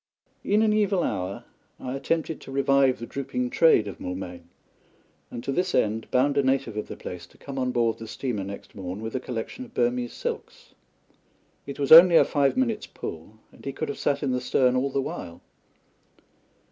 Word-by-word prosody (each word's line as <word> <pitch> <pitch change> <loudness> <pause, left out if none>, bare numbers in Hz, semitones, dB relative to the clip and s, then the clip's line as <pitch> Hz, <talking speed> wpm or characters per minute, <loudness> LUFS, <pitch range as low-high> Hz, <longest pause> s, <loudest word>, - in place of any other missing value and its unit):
In 210 +2 +3
an 215 -1 +3
evil 205 -4 +2
hour 95 +1 -3 0.4
I 130 - -5
attempted 160 +3 -2
to - - -10
revive 135 -1 +3
the 115 - -6
drooping 125 -2 -3
trade 160 -10 +4
of 100 - -7
Moulmein, 90 -2 -6 0.8
and 120 - -7
to 135 - -2
this 180 +6 0
end 110 +1 0
bound 140 +3 +2
a - - +5
native 135 -4 0
of 105 - -4
the - - -8
place 90 -1 -8
to - - -23
come 135 -1 -7
on 125 -1 0
board 115 -2 +1
the 115 - -8
steamer 110 -3 -3
next 100 +1 -8
morn 95 -1 -6
with 110 - -5
a - - +1
collection 125 - -5
of 240 - -14
Burmese 120 0 0
silks. - - -6 0.9
It 140 - -6
was 140 -1 -2
only 170 +2 +10
a - - +7
five 140 - +1
minutes' 230 -5 0
pull, 80 +5 -8 0.2
and - - -18
he 135 - -3
could 155 +1 -4
have 140 - -5
sat 145 +1 0
in 135 - 0
the 125 0 -1
stern 125 0 +2
all 130 +2 +1
the 135 - -1
while. 85 -10 -6
130 Hz, 195 wpm, -26 LUFS, 110-145 Hz, 0.9 s, only